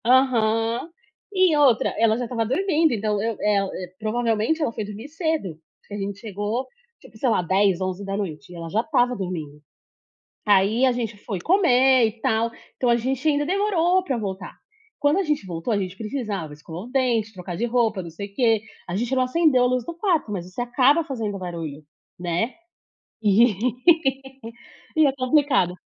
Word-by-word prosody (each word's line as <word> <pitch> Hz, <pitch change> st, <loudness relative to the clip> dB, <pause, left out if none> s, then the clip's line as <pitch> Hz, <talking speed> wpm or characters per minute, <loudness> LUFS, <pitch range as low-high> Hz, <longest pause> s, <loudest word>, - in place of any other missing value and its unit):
Aham, 235 Hz, 0 st, +2 dB, 0.4 s
e 370 Hz, -5 st, +3 dB
outra, 270 Hz, -6 st, +4 dB
ela 225 Hz, -1 st, +3 dB
já 245 Hz, -, -2 dB
estava 230 Hz, -1 st, -1 dB
dormindo, 320 Hz, -, +2 dB
então 210 Hz, -2 st, -1 dB
eu 225 Hz, 0 st, -2 dB
eh, 210 Hz, -1 st, +2 dB
hã, 195 Hz, -1 st, -2 dB, 0.3 s
provavelmente 225 Hz, +5 st, 0 dB
ela 295 Hz, -, +1 dB
foi 225 Hz, -, -4 dB
dormir 210 Hz, +5 st, -8 dB
cedo, 315 Hz, -, -2 dB, 0.3 s
que -, -, -11 dB
a -, -, -3 dB
gente 200 Hz, 0 st, -4 dB
chegou, 210 Hz, +4 st, -3 dB, 0.3 s
tipo, -, -, -16 dB
sei 250 Hz, +3 st, +1 dB
lá, 200 Hz, -5 st, +2 dB
22:00, 190 Hz, +1 st, +2 dB
23:00, 190 Hz, -2 st, -4 dB
e -, -, -10 dB
ela 165 Hz, -1 st, -6 dB
já 215 Hz, +6 st, +1 dB
estava 250 Hz, -3 st, +1 dB
dormindo. 160 Hz, -7 st, -5 dB, 0.9 s
Aí 210 Hz, +5 st, +4 dB
a 255 Hz, -, +3 dB
gente 230 Hz, -4 st, -4 dB
foi 200 Hz, -2 st, -5 dB
comer 265 Hz, -, +4 dB
e 220 Hz, +1 st, -6 dB
tal, 225 Hz, +1 st, +1 dB, 0.3 s
então 250 Hz, -, 0 dB
a 235 Hz, -, +5 dB
gente 260 Hz, +5 st, -1 dB
ainda 290 Hz, -1 st, +2 dB
demorou 370 Hz, 0 st, +2 dB
para 275 Hz, -8 st, -2 dB
voltar, 195 Hz, -3 st, -5 dB, 0.4 s
quando 290 Hz, +4 st, +2 dB
a -, -, +2 dB
gente 300 Hz, -, -1 dB
voltou, 170 Hz, +4 st, -4 dB
a 210 Hz, -, +2 dB
gente 190 Hz, -1 st, -4 dB
precisava 210 Hz, -, -4 dB
escovar 160 Hz, +5 st, -9 dB
o 245 Hz, -, -11 dB
dente, 240 Hz, -5 st, +1 dB
trocar 180 Hz, -1 st, -7 dB
de 235 Hz, -, -1 dB
roupa, 225 Hz, -5 st, +1 dB
não 170 Hz, -, -8 dB
sei 200 Hz, +5 st, -7 dB
o 200 Hz, -, -26 dB
quê 225 Hz, -2 st, +2 dB, 0.3 s
a 175 Hz, -, -2 dB
gente 240 Hz, +5 st, -1 dB
não 255 Hz, -, +2 dB
acendeu 260 Hz, -2 st, +3 dB
a -, -, +4 dB
luz 250 Hz, -1 st, 0 dB
do 340 Hz, -, -6 dB
quarto, 335 Hz, -, 0 dB
mas 180 Hz, -2 st, -5 dB
você 225 Hz, +6 st, -4 dB
acaba 265 Hz, +6 st, +3 dB
fazendo 225 Hz, -8 st, -4 dB
barulho, 165 Hz, -5 st, -6 dB, 0.3 s
né, 175 Hz, +7 st, -1 dB, 0.7 s
e 210 Hz, 0 st, +4 dB, 1.4 s
e 315 Hz, -1 st, +6 dB
é 275 Hz, -, +2 dB
complicado. 255 Hz, -, +2 dB
225 Hz, 185 wpm, -23 LUFS, 195-265 Hz, 1.4 s, e